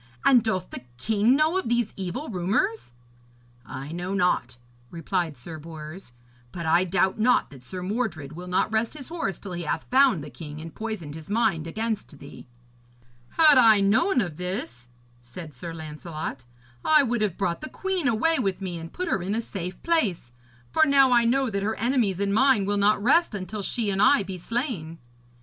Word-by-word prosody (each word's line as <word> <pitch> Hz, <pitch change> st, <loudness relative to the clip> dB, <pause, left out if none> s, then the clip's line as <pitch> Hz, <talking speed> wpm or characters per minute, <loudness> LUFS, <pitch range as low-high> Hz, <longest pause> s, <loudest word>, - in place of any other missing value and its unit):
And 250 Hz, -3 st, +6 dB
doth 190 Hz, -5 st, -2 dB
the -, -, -5 dB, 0.2 s
king 220 Hz, -, +2 dB
know 315 Hz, +5 st, +2 dB
of 375 Hz, -, -4 dB
these 240 Hz, -2 st, 0 dB
evil 195 Hz, -, -4 dB
rumours?' 190 Hz, -, -1 dB, 0.8 s
'I 135 Hz, +3 st, -7 dB
know 175 Hz, +3 st, -3 dB
not,' 180 Hz, -10 st, +1 dB, 0.3 s
replied 170 Hz, -2 st, -2 dB
Sir 155 Hz, +6 st, -8 dB
Bors, 155 Hz, +1 st, -9 dB, 0.4 s
'but 170 Hz, -2 st, -6 dB
I 170 Hz, +3 st, +3 dB
doubt 190 Hz, +3 st, +1 dB
not 245 Hz, -4 st, +3 dB
that 135 Hz, -3 st, -13 dB
Sir 180 Hz, +8 st, -7 dB
Mordred 185 Hz, -, -3 dB
will 175 Hz, +3 st, -8 dB
not 180 Hz, +3 st, +1 dB
rest 220 Hz, +4 st, 0 dB
his 270 Hz, -4 st, -7 dB
horse 325 Hz, -, -3 dB
till 200 Hz, -, -9 dB
he 175 Hz, -, -4 dB
hath 160 Hz, 0 st, -2 dB
found 255 Hz, -, +4 dB
the 150 Hz, -, -9 dB
king 150 Hz, +4 st, -9 dB
and 160 Hz, 0 st, -9 dB
poisoned 215 Hz, -10 st, -5 dB
his 160 Hz, +2 st, -10 dB
mind 205 Hz, -7 st, +1 dB
against 220 Hz, -4 st, -4 dB
thee.' -, -, -12 dB, 0.9 s
'Had 305 Hz, -4 st, +7 dB
I 220 Hz, -4 st, +7 dB
known 225 Hz, -, +3 dB
of 175 Hz, -7 st, -4 dB
this,' 150 Hz, -, -5 dB, 0.3 s
said 150 Hz, +6 st, -10 dB
Sir 165 Hz, +7 st, -7 dB
Lancelot, 155 Hz, -4 st, -7 dB, 0.4 s
'I 305 Hz, -2 st, +5 dB
would 240 Hz, -3 st, -1 dB
have 205 Hz, -5 st, 0 dB
brought 170 Hz, -3 st, -1 dB
the 310 Hz, -, -6 dB
queen 380 Hz, -5 st, -2 dB
away 280 Hz, +7 st, +2 dB
with 195 Hz, -6 st, -1 dB
me 180 Hz, -3 st, -5 dB
and 165 Hz, +1 st, -9 dB
put 365 Hz, -, -4 dB
her 205 Hz, -, 0 dB
in 195 Hz, +4 st, -2 dB
a -, -, 0 dB
safe 185 Hz, -5 st, -6 dB
place, 215 Hz, -, 0 dB, 0.4 s
for 315 Hz, -, +4 dB
now 275 Hz, -3 st, +5 dB
I 240 Hz, -1 st, +5 dB
know 260 Hz, +1 st, +2 dB
that 200 Hz, -1 st, -1 dB
her 220 Hz, +2 st, -1 dB
enemies 230 Hz, -5 st, 0 dB
and 200 Hz, 0 st, 0 dB
mine 255 Hz, -3 st, +4 dB
will 205 Hz, +1 st, 0 dB
not 205 Hz, 0 st, +3 dB
rest 310 Hz, 0 st, +3 dB
until 200 Hz, +2 st, -5 dB
she 215 Hz, +1 st, -1 dB
and 195 Hz, 0 st, 0 dB
I 280 Hz, -1 st, +5 dB
be 190 Hz, -1 st, -7 dB
slain.' 210 Hz, -, -3 dB
195 Hz, 190 wpm, -25 LUFS, 165-235 Hz, 0.9 s, Had